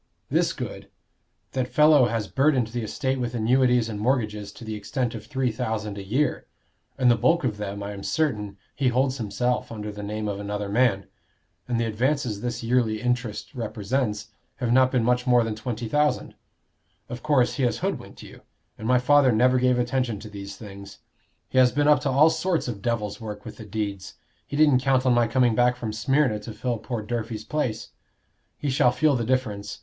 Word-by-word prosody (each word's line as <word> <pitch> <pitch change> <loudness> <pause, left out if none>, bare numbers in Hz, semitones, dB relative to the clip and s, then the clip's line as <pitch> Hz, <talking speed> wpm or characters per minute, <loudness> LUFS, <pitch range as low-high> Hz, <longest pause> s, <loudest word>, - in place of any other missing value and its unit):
This - - +2
good: - - -7 0.6
that 130 -1 -1
fellow 150 -1 +5
has 115 -2 -2
burdened 135 -4 +2
the 120 +1 -3
estate 130 +4 -2
with 120 -1 -3
annuities 125 +1 +3
and 105 -2 -5
mortgages 105 -4 -1
to 115 - -11
the 110 - -4
extent 115 +4 -2
of 110 -2 -8
three 130 -4 0
thousand 110 -3 -3
a - - -6
year; 125 +8 -1 0.5
and 125 -2 +4
the - - +5
bulk 165 +9 +2
of 115 -5 -1
them, 100 -1 -5
I 100 - -5
am 100 -1 -7
certain, 105 -9 -1 0.2
he 135 - 0
holds 130 +2 +1
himself 120 +4 -1
under 105 -2 -5
the 105 0 -8
name 105 +1 -4
of 100 -1 -3
another 105 0 -4
man. 105 -3 +2 0.6
And 120 -2 0
the 115 - +1
advances 115 -1 -1
this 120 0 -3
yearly 115 -2 +1
interest 125 0 -2
represents, 110 -1 -2 0.3
have 120 -3 -2
not 130 0 +5
been 125 -3 +1
much 125 +2 +1
more 125 -1 +5
than 115 -1 -2
twenty 115 +1 -4
thousand. 150 +5 0 0.7
Of 120 +1 -7
course, 145 -5 +2
he 135 - 0
has 120 - 0
hoodwinked - - -4
you, - - -13 0.4
and 110 - -5
my 125 +1 +4
father 135 +1 +4
never 125 +3 +4
gave 125 0 +3
attention 125 -3 -1
to 110 - -9
these 100 -1 -8
things. 100 -2 -10 0.5
He 130 - +1
has 125 -1 +6
been 145 +2 +1
up 150 - +6
to 140 - -1
all 145 +5 +5
sorts 180 -4 -1
of 110 -5 -5
devil's 110 -2 -2
work 105 -2 -7
with - - -9
the 110 - -9
deeds; 100 -2 -4 0.3
he 145 - -4
didn't 150 -4 +5
count 130 -1 +2
on 125 - +4
my 120 -1 +3
coming 125 -1 +3
back 125 +2 +3
from 110 -3 -5
Smyrna 110 +1 +1
to 110 +1 -8
fill 120 +2 -2
poor 115 -1 -4
Durfey's 115 -1 -4
place. 120 -7 -2 0.7
He 145 - -2
shall 125 -2 +4
feel 150 +2 +2
the 120 - -1
difference. 110 -5 -2
120 Hz, 200 wpm, -25 LUFS, 105-130 Hz, 0.7 s, has